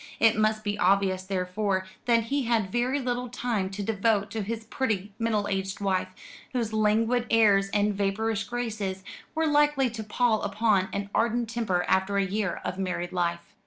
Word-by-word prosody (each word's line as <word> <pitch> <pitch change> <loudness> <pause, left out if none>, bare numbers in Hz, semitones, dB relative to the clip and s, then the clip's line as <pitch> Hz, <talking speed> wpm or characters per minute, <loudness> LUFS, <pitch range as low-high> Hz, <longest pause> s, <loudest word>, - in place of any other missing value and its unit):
It 225 0 +5
must 215 0 +1
be 205 0 -2
obvious, 190 0 +3
therefore, 190 +1 -1 0.2
that 230 -2 +3
he 275 +3 -1
had 225 -5 +1
very 250 +4 +1
little 250 -1 -2
time 230 -5 -2
to 200 +1 -5
devote 210 0 +1
to 220 - -2
his 220 +2 -4
pretty 215 -4 -2
middle 220 -3 0
aged 195 -1 -2
wife, 190 -2 0 0.5
whose 230 -3 -1
languid 225 +3 +2
airs 205 -3 +4
and 205 +1 +1
vapourish 200 +2 -1
graces 215 -6 -3 0.3
were 320 0 +1
likely 295 -4 +3
to 225 -1 -5
pall 220 +1 +1
upon 200 -2 +1
an 200 0 -4
ardent 235 0 +1
temper 205 -7 0
after 190 +1 +2
a 200 - +2
year 200 0 -2
of 185 - -3
married 180 -2 -2
life. 170 -1 -2
210 Hz, 170 wpm, -27 LUFS, 195-230 Hz, 0.5 s, It